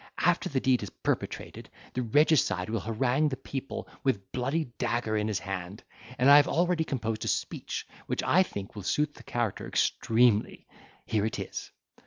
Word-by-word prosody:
After 175 Hz, 0 st, +2 dB
the 140 Hz, -, 0 dB
deed 130 Hz, -1 st, +2 dB
is 100 Hz, -, -5 dB
perpetrated, -, -, -4 dB, 0.2 s
the 130 Hz, -, -1 dB
regicide 120 Hz, -, +3 dB
will 115 Hz, -, 0 dB
harangue 125 Hz, +8 st, +1 dB
the 130 Hz, -, -4 dB
people 135 Hz, 0 st, -5 dB, 0.2 s
with 135 Hz, -3 st, +3 dB
the 95 Hz, -1 st, -21 dB
bloody 135 Hz, +6 st, 0 dB
dagger 115 Hz, -2 st, 0 dB
in 105 Hz, 0 st, 0 dB
his 105 Hz, -3 st, 0 dB
hand; 95 Hz, 0 st, -5 dB, 0.3 s
and 125 Hz, -, +3 dB
I 140 Hz, +1 st, +10 dB
have 145 Hz, -, +5 dB
already 175 Hz, 0 st, +2 dB
composed 115 Hz, -7 st, -3 dB
a -, -, -3 dB
speech, -, -, -2 dB, 0.2 s
which, -, -, -1 dB
I 185 Hz, -, +5 dB
think, 100 Hz, -, -4 dB
will 105 Hz, -, -5 dB
suit 150 Hz, +10 st, 0 dB
the -, -, -14 dB
character 120 Hz, -5 st, -2 dB
extremely. 115 Hz, -2 st, +2 dB, 0.4 s
Here 110 Hz, -1 st, +1 dB
it 110 Hz, -, -4 dB
is." -, -, -5 dB
120 Hz, 180 wpm, -29 LUFS, 110-145 Hz, 0.4 s, I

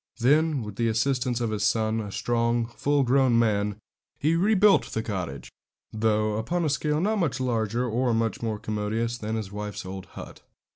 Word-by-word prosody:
Then, 145 Hz, +2 st, +3 dB
with 105 Hz, -2 st, -8 dB
the 115 Hz, -, +1 dB
assistance 125 Hz, +1 st, 0 dB
of 115 Hz, -2 st, -1 dB
his 105 Hz, -1 st, -2 dB
son, 110 Hz, +2 st, +1 dB
a 105 Hz, -2 st, -6 dB
strong, 115 Hz, +3 st, 0 dB
full 140 Hz, +4 st, 0 dB
grown 130 Hz, 0 st, +3 dB
young -, -, +4 dB
man, 105 Hz, -3 st, +1 dB, 0.4 s
he 155 Hz, +3 st, +1 dB
rebuilt 205 Hz, +2 st, +4 dB
the 110 Hz, -, -3 dB
cottage, 90 Hz, -11 st, -5 dB, 0.4 s
though 110 Hz, -1 st, +1 dB
upon 170 Hz, +10 st, -1 dB
a -, -, +1 dB
scale 150 Hz, +1 st, 0 dB
not 210 Hz, +5 st, +1 dB
much 160 Hz, -8 st, 0 dB
larger 120 Hz, -1 st, 0 dB
or 120 Hz, +2 st, 0 dB
much 115 Hz, -2 st, 0 dB
more 110 Hz, -2 st, -2 dB
commodious 110 Hz, +3 st, -2 dB
than 110 Hz, +1 st, -3 dB
his 105 Hz, -3 st, -4 dB
wife's 105 Hz, -2 st, -5 dB
old 95 Hz, 0 st, -7 dB
hut. -, -, -11 dB
115 Hz, 185 wpm, -26 LUFS, 105-130 Hz, 0.4 s, young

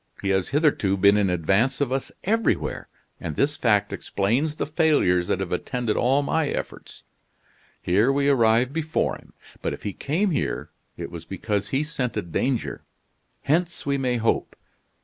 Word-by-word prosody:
He 100 Hz, -, -2 dB
has 95 Hz, -1 st, +1 dB
hitherto 140 Hz, -10 st, +2 dB
been 100 Hz, +2 st, +5 dB
in 100 Hz, -2 st, +2 dB
advance 95 Hz, +9 st, +1 dB
of 140 Hz, -3 st, 0 dB
us 135 Hz, 0 st, -2 dB
everywhere, 225 Hz, +3 st, 0 dB, 0.3 s
and 75 Hz, -, -5 dB
this 145 Hz, -, +1 dB
fact 105 Hz, -5 st, +2 dB
explains 125 Hz, +11 st, 0 dB
the -, -, -2 dB
failures 145 Hz, -, +2 dB
that -, -, 0 dB
have 95 Hz, -, -4 dB
attended 115 Hz, +5 st, -1 dB
all 135 Hz, +4 st, +2 dB
my 160 Hz, +2 st, 0 dB
efforts. -, -, -6 dB, 0.8 s
Here 105 Hz, +9 st, +3 dB
we 140 Hz, 0 st, +1 dB
arrive 120 Hz, -1 st, +3 dB
before 160 Hz, 0 st, 0 dB
him. -, -, -20 dB, 0.3 s
But -, -, -2 dB
if -, -, -18 dB
he 100 Hz, -, -3 dB
came 175 Hz, -, 0 dB
here, 145 Hz, -, -2 dB, 0.3 s
it -, -, -6 dB
was 85 Hz, -1 st, -8 dB
because 100 Hz, +1 st, -2 dB
he 135 Hz, +7 st, 0 dB
scented 125 Hz, -, -3 dB
danger. 125 Hz, +5 st, -1 dB, 0.6 s
Hence, 170 Hz, +4 st, 0 dB
we 140 Hz, -1 st, 0 dB
may 125 Hz, -2 st, 0 dB
hope. 115 Hz, 0 st, 0 dB
125 Hz, 165 wpm, -24 LUFS, 100-145 Hz, 0.8 s, been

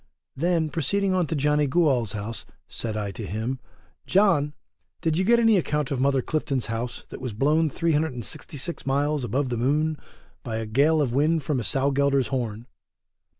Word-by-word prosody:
Then 165 Hz, +1 st, +1 dB
proceeding 195 Hz, +5 st, 0 dB
on 180 Hz, -3 st, +1 dB
to 160 Hz, -, -2 dB
Johnny 150 Hz, +1 st, +2 dB
Gooal's 130 Hz, -, +2 dB
house, 110 Hz, +2 st, -5 dB, 0.2 s
said 110 Hz, -2 st, -4 dB
I 100 Hz, -2 st, -2 dB
to 110 Hz, -, -7 dB
him, 110 Hz, +6 st, -3 dB, 0.5 s
John, 160 Hz, -7 st, +3 dB, 0.5 s
did 160 Hz, -1 st, +1 dB
you 185 Hz, -, +2 dB
get 235 Hz, +5 st, +5 dB
any 225 Hz, -3 st, +5 dB
account 150 Hz, -4 st, -1 dB
of 135 Hz, -, -1 dB
Mother 135 Hz, -1 st, +2 dB
Clifton's 140 Hz, -5 st, -1 dB
house, 120 Hz, +1 st, -4 dB
that -, -, -9 dB
was 125 Hz, -4 st, -4 dB
blown 150 Hz, +7 st, +2 dB
366 150 Hz, 0 st, -2 dB
miles 145 Hz, +1 st, +1 dB
above 130 Hz, +4 st, -1 dB
the 120 Hz, -, -2 dB
moon 150 Hz, +5 st, +1 dB, 0.4 s
by 115 Hz, -4 st, -4 dB
a 110 Hz, 0 st, -2 dB
gale 145 Hz, +8 st, +3 dB
of 120 Hz, -4 st, -2 dB
wind 155 Hz, +3 st, +2 dB
from 140 Hz, -2 st, 0 dB
a -, -, -3 dB
sow 135 Hz, +4 st, +1 dB
gelder's 140 Hz, -3 st, +2 dB
horn. 115 Hz, -4 st, -3 dB
140 Hz, 175 wpm, -25 LUFS, 120-155 Hz, 0.5 s, get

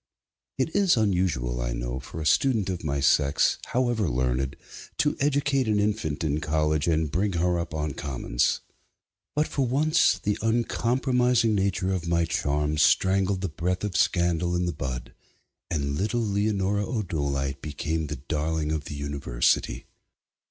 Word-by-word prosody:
It 135 Hz, +5 st, -1 dB
is 195 Hz, -8 st, +4 dB
unusual, 90 Hz, -, 0 dB
I -, -, -2 dB
know, -, -, -3 dB
for 70 Hz, +5 st, -8 dB
a -, -, -4 dB
student 110 Hz, -, +2 dB
of 90 Hz, -2 st, -5 dB
my 70 Hz, -2 st, -1 dB
sex, 70 Hz, +1 st, +3 dB
however 120 Hz, -7 st, 0 dB
learned, 65 Hz, +2 st, -1 dB, 0.4 s
to 150 Hz, -, +2 dB
educate 140 Hz, -2 st, +1 dB
an 105 Hz, -1 st, +2 dB
infant 100 Hz, -8 st, -1 dB
in 75 Hz, -1 st, 0 dB
college 75 Hz, 0 st, 0 dB
and 80 Hz, -3 st, +1 dB
bring 95 Hz, +4 st, 0 dB
her 90 Hz, 0 st, +1 dB
up 85 Hz, -2 st, -4 dB
on 75 Hz, -2 st, -2 dB
commons. 65 Hz, -4 st, -1 dB, 0.7 s
But 150 Hz, +1 st, +2 dB
for 135 Hz, -3 st, -1 dB
once 150 Hz, +5 st, +3 dB
the 105 Hz, 0 st, -2 dB
uncompromising 120 Hz, +1 st, +2 dB
nature 95 Hz, -1 st, 0 dB
of 90 Hz, -3 st, -3 dB
my 85 Hz, 0 st, +2 dB
charms 75 Hz, -1 st, 0 dB
strangled 95 Hz, +3 st, +3 dB
the 95 Hz, -, -2 dB
breath 90 Hz, +4 st, -2 dB
of 105 Hz, -4 st, -3 dB
scandal 85 Hz, 0 st, +1 dB
in 90 Hz, 0 st, 0 dB
the 85 Hz, -, -1 dB
bud, 65 Hz, -4 st, -5 dB, 0.6 s
and 70 Hz, -3 st, -1 dB
little 110 Hz, +9 st, 0 dB
Leonora 100 Hz, 0 st, 0 dB
O'Dolite 70 Hz, -, -2 dB
became 75 Hz, +1 st, -3 dB
the 75 Hz, -, -4 dB
darling 75 Hz, +3 st, -2 dB
of 80 Hz, -1 st, -2 dB
the 75 Hz, -, -6 dB
university. 70 Hz, -4 st, 0 dB
85 Hz, 150 wpm, -26 LUFS, 75-105 Hz, 0.7 s, is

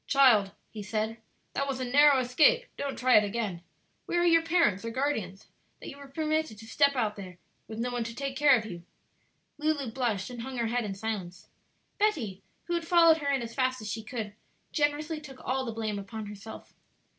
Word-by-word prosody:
"Child," 245 Hz, -8 st, +5 dB, 0.2 s
he 215 Hz, -, -7 dB
said, 215 Hz, +2 st, -2 dB, 0.4 s
"that 275 Hz, -, -1 dB
was 270 Hz, -2 st, -3 dB
a 255 Hz, -, -2 dB
narrow 285 Hz, +3 st, +6 dB
escape; 325 Hz, -, +4 dB
don't 280 Hz, -1 st, -4 dB
try 255 Hz, -2 st, +5 dB
it 210 Hz, -, +5 dB
again. 205 Hz, -4 st, -3 dB, 0.5 s
Where 345 Hz, -, +1 dB
are -, -, +2 dB
your 330 Hz, -1 st, +5 dB
parents 330 Hz, -, +2 dB
or 230 Hz, -, -3 dB
guardians, 225 Hz, -7 st, -2 dB, 0.3 s
that -, -, -8 dB
you 280 Hz, -, -10 dB
were 280 Hz, -, -11 dB
permitted 310 Hz, -3 st, -1 dB
to 220 Hz, -, -11 dB
step 280 Hz, +4 st, +3 dB
out 220 Hz, -4 st, 0 dB
there 185 Hz, -3 st, -9 dB, 0.3 s
with 220 Hz, -, -7 dB
no 245 Hz, +2 st, -2 dB
one 245 Hz, -1 st, -1 dB
to 230 Hz, 0 st, -6 dB
take 275 Hz, 0 st, -4 dB
care 290 Hz, -2 st, +6 dB
of 215 Hz, -, -4 dB
you?" 175 Hz, -5 st, -7 dB, 0.8 s
Lulu 295 Hz, -5 st, 0 dB
blushed 230 Hz, -4 st, -2 dB
and 240 Hz, -1 st, -7 dB
hung 260 Hz, +1 st, -6 dB
her 235 Hz, -, 0 dB
head 240 Hz, 0 st, 0 dB
in 195 Hz, -2 st, -4 dB
silence. 195 Hz, -4 st, -5 dB, 0.5 s
Betty, 245 Hz, -, 0 dB, 0.2 s
who 345 Hz, -, -4 dB
had 340 Hz, -1 st, -2 dB
followed 335 Hz, -2 st, +6 dB
her 285 Hz, -3 st, -2 dB
in 270 Hz, -3 st, 0 dB
as 230 Hz, 0 st, -7 dB
fast 255 Hz, 0 st, 0 dB
as 215 Hz, -1 st, -5 dB
she 220 Hz, -, -4 dB
could, 220 Hz, -2 st, -5 dB, 0.4 s
generously 300 Hz, +1 st, 0 dB
took 270 Hz, -4 st, -11 dB
all 260 Hz, +1 st, -1 dB
the 230 Hz, -, -3 dB
blame 215 Hz, -2 st, -3 dB
upon 215 Hz, +2 st, -7 dB
herself. 205 Hz, +1 st, -10 dB
245 Hz, 210 wpm, -29 LUFS, 215-285 Hz, 0.8 s, narrow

